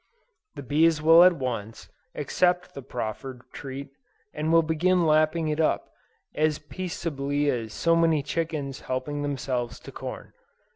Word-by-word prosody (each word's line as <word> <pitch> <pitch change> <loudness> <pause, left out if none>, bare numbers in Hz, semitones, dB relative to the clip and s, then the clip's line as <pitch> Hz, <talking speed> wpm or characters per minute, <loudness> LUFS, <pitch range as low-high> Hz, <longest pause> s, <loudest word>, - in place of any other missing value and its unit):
The - - -7
bees 155 +4 +3
will 165 +2 +7
at 180 0 +7
once, 115 -4 -4 0.3
accept 180 0 +1
the 140 - -7
proffered 125 +1 -6
treat, 140 0 -7 0.4
and 155 +1 -1
will 165 0 +6
begin 170 +3 +2
lapping 155 +1 +3
it 150 +1 -1
up, 160 - +1 0.4
as 155 0 +1
peaceably 145 -5 -2
as 115 -3 -3
so 165 +9 +2
many 165 -3 +3
chickens 150 -3 -3
helping 130 +3 -3
themselves 130 -4 -3
to - - -10
corn. - - -8
150 Hz, 140 wpm, -26 LUFS, 135-165 Hz, 0.4 s, will